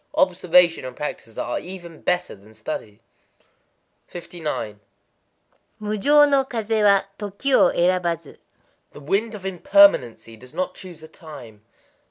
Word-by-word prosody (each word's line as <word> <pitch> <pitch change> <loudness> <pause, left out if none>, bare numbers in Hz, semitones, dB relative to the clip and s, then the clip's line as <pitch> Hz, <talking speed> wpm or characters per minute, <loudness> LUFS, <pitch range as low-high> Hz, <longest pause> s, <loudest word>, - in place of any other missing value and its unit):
Observation 180 -2 +3
and 130 - -7
practice 115 -6 -6
are 120 - -2
even 175 -3 -9
better 180 0 -1
than 105 +2 -19
study. 110 -2 -7 1.1
59.—Mujō 155 -12 -5 1.5
no 275 -1 +3
kazé 225 -3 -1
wa, 200 -1 +5 0.2
toki 205 +6 -3
erabazu. 175 - +2 0.6
The - - -11
Wind 200 +10 -1
of 195 -2 -10
Impermanency 180 - +3
does 125 +2 -15
not 185 0 -2
choose 175 -5 -12
a - - -10
time. 135 -10 -13
175 Hz, 115 wpm, -22 LUFS, 130-195 Hz, 1.5 s, wa